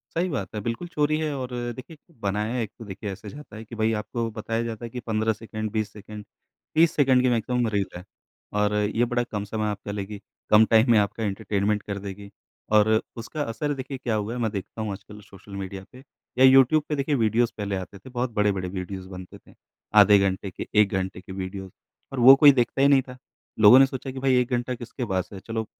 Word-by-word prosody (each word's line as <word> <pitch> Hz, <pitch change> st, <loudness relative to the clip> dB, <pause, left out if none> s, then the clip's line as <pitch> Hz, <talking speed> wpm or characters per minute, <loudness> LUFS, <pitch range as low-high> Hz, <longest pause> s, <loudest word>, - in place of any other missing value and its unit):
सही 180 Hz, +2 st, +1 dB
बात 105 Hz, -10 st, -4 dB
है, 105 Hz, -, -3 dB
बिल्कुल 115 Hz, -, -4 dB
चोरी 150 Hz, -2 st, +1 dB
है 155 Hz, -1 st, -1 dB
और 130 Hz, -1 st, -5 dB, 0.3 s
देखिए, 150 Hz, +5 st, -10 dB, 0.2 s
बनाया 105 Hz, +3 st, -1 dB
है 125 Hz, -, 0 dB
एक 110 Hz, -, -5 dB
तो 115 Hz, -, -9 dB
देखिए 100 Hz, +1 st, -6 dB
ऐसे 95 Hz, -, -10 dB
जाता 145 Hz, -6 st, -11 dB
है 110 Hz, -, -8 dB
कि 115 Hz, -, -11 dB
भाई 110 Hz, 0 st, +1 dB
आपको 115 Hz, +2 st, -3 dB
बताया 115 Hz, +1 st, -3 dB
जाता 115 Hz, 0 st, -5 dB
है 115 Hz, -, -6 dB
कि 125 Hz, -, -6 dB
15 110 Hz, 0 st, +1 dB
सेकंड, 110 Hz, -1 st, -6 dB
20 110 Hz, -2 st, -2 dB
सेकंड, 105 Hz, 0 st, -10 dB, 0.5 s
30 165 Hz, +1 st, +5 dB
सेकंड 130 Hz, -3 st, +4 dB
की 130 Hz, -, +3 dB
मैक्सिमम 120 Hz, +1 st, 0 dB
रील 100 Hz, -2 st, 0 dB
है। 90 Hz, -, -9 dB, 0.5 s
और 105 Hz, 0 st, +2 dB
ये 105 Hz, +3 st, +1 dB
बड़ा 120 Hz, 0 st, 0 dB
कम 105 Hz, -3 st, -5 dB
समय 110 Hz, +1 st, -3 dB
आपका 100 Hz, 0 st, -6 dB
लेगी, 100 Hz, 0 st, -6 dB, 0.3 s
कम 105 Hz, +1 st, +7 dB
टाइम 115 Hz, +2 st, +4 dB
में 110 Hz, -, +6 dB
आपका 105 Hz, +2 st, -1 dB
एंटरटेनमेंट 105 Hz, 0 st, -1 dB
कर 100 Hz, -1 st, -5 dB
देगी। 100 Hz, 0 st, -8 dB, 0.5 s
और 105 Hz, 0 st, +5 dB, 0.3 s
उसका 135 Hz, +6 st, -5 dB
असर 145 Hz, +4 st, -2 dB
देखिए 135 Hz, 0 st, -6 dB
क्या 120 Hz, -4 st, -2 dB
हुआ 105 Hz, +1 st, -2 dB
है 125 Hz, -, -4 dB
मैं 110 Hz, -, 0 dB
देखता 105 Hz, +2 st, -6 dB
हूँ 105 Hz, -2 st, -3 dB
आजकल 105 Hz, +2 st, -10 dB
सोशल 100 Hz, 0 st, -16 dB
मीडिया 95 Hz, 0 st, -6 dB
पे 130 Hz, +1 st, -13 dB, 0.4 s
या 130 Hz, -, +6 dB
यूट्यूब 135 Hz, +3 st, +6 dB
पे 150 Hz, -, -1 dB
देखिए 140 Hz, +1 st, 0 dB
वीडियोज़ 115 Hz, 0 st, +2 dB
पहले 100 Hz, -2 st, -3 dB
आते 95 Hz, +1 st, -7 dB
थे, 130 Hz, -, -13 dB
बहुत 125 Hz, 0 st, -2 dB
बड़े-बड़े 100 Hz, -4 st, 0 dB
वीडियोज़ 95 Hz, 0 st, -6 dB
बनते 90 Hz, -1 st, -10 dB
थे। -, -, -21 dB, 0.5 s
आधे 105 Hz, 0 st, +7 dB
घंटे 95 Hz, 0 st, -1 dB
के, -, -, -7 dB
1 105 Hz, -1 st, +5 dB
घंटे 95 Hz, -1 st, -2 dB
के 95 Hz, -, -11 dB
वीडियोज़ 95 Hz, 0 st, -6 dB, 0.4 s
और 130 Hz, -, -3 dB
वो 130 Hz, +3 st, +10 dB
कोई 145 Hz, -1 st, +10 dB
देखता 130 Hz, +1 st, 0 dB
ही 140 Hz, -, +6 dB
नहीं 135 Hz, -2 st, +5 dB
था, 125 Hz, 0 st, -11 dB, 0.4 s
लोगों 110 Hz, +4 st, +9 dB
ने 135 Hz, -, +7 dB
सोचा 135 Hz, 0 st, -6 dB
कि 130 Hz, -, -7 dB
भाई 130 Hz, -1 st, +2 dB
1 125 Hz, -, -2 dB
घंटा 120 Hz, +1 st, -1 dB
किसके 120 Hz, +2 st, -6 dB
पास 95 Hz, -1 st, -2 dB
है, 95 Hz, -, -8 dB
चलो 115 Hz, +1 st, -4 dB
110 Hz, 230 wpm, -25 LUFS, 100-125 Hz, 0.5 s, वो